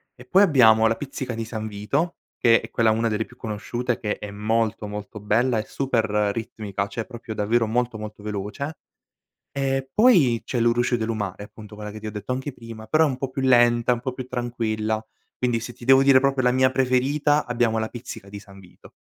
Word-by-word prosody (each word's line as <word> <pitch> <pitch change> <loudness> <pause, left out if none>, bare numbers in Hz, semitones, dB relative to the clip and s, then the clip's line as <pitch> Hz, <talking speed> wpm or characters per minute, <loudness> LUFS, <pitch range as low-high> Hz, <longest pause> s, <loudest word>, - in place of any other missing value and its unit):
e 125 0 -14
poi 190 +10 +5
abbiamo 115 - +6
La 115 - +1
Pizzica 130 -2 -5
di 115 0 -4
San 110 -1 -5
Vito, 110 +12 -2 0.2
che 115 -1 +4
è - - -9
quella 115 -1 +2
una 115 +1 +1
delle 110 +1 -1
più 125 - -18
conosciute, 120 +2 -3
che 105 -2 -3
è 105 - -6
molto 110 +1 -1
molto 105 +1 -7
bella 115 +4 +1
e - - -2
super 130 -4 0 0.3
ritmica, 105 -3 -4
cioè 110 +2 -5
proprio 120 -3 -8
davvero 115 +3 +1
molto 120 0 -1
molto 105 -1 -8
veloce, 105 +9 -4 0.8
e 135 -1 -1
poi 170 - +5
c'è 125 - -2
Lu 115 0 +4
Rusciu 120 0 +1
De 110 - -2
Lu 115 - -2
Mare, 100 -2 -4
appunto 105 0 -12
quella 105 0 -7
che 110 - -9
ti 110 - -7
ho - - -4
detto 105 +4 -6
anche 130 +3 -3
prima, 115 -2 -10
però 155 +6 +4
è - - +2
un 130 - -3
po' 135 0 -3
più 135 - -4
lenta, 120 -2 +4
è 125 - +3
un 120 - -8
po' 130 0 -3
più 130 0 -6
tranquilla, 110 -3 -2 0.3
quindi 120 -2 0
se 120 +1 -7
ti 120 - -13
devo 135 0 +6
dire 135 -1 +6
proprio 135 -1 +1
la 125 - +4
mia 130 +1 +3
preferita 135 +4 +2
abbiamo 120 -2 +1
La 110 - -1
Pizzica 115 -4 -9
di 100 0 -8
San 100 -1 -15
Vito. 90 -2 -17
115 Hz, 225 wpm, -24 LUFS, 110-130 Hz, 0.8 s, abbiamo